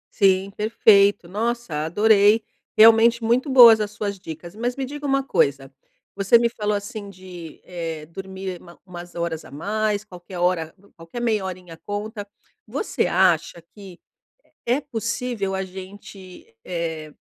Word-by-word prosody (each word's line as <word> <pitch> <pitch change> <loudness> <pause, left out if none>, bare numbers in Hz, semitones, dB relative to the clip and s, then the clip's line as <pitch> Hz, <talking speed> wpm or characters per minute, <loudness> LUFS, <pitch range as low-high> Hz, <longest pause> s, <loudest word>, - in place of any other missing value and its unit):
Sim, 195 -1 +3
perfeito. 205 -3 +3
Nossa, 210 -6 -3
adorei! 210 +4 +4 0.3
Realmente 225 +1 +6
muito 245 +5 +1
boas 240 -4 +9
as 210 - -2
suas 205 -1 -5
dicas. 170 0 -9
Mas 240 +3 -2
me 270 - -3
diga 290 +2 -6
uma 275 0 +1
coisa: 140 - 0 0.4
você 195 +3 +4
me 235 0 +1
falou 210 -3 -2
assim 205 0 -6
de, 180 -4 -11
eh, 165 -3 -6
dormir 190 +1 -7
uma 170 -1 -16
umas 175 -1 -10
horas 170 -2 -3
a - - -14
mais, 210 +7 -2
qualquer 180 -1 -11
hora 175 -2 0 0.2
qualquer 165 +8 -9
meia 220 -4 0
horinha 180 -2 -7
conta. 205 0 -5 0.4
Você - - -1
acha 175 -3 +2
que 195 -4 -13 0.7
é 245 +4 +1
possível 230 -6 -3
a 190 - -2
gente, 190 0 -11 0.2
eh 160 -3 -4
195 Hz, 140 wpm, -22 LUFS, 175-220 Hz, 0.7 s, boas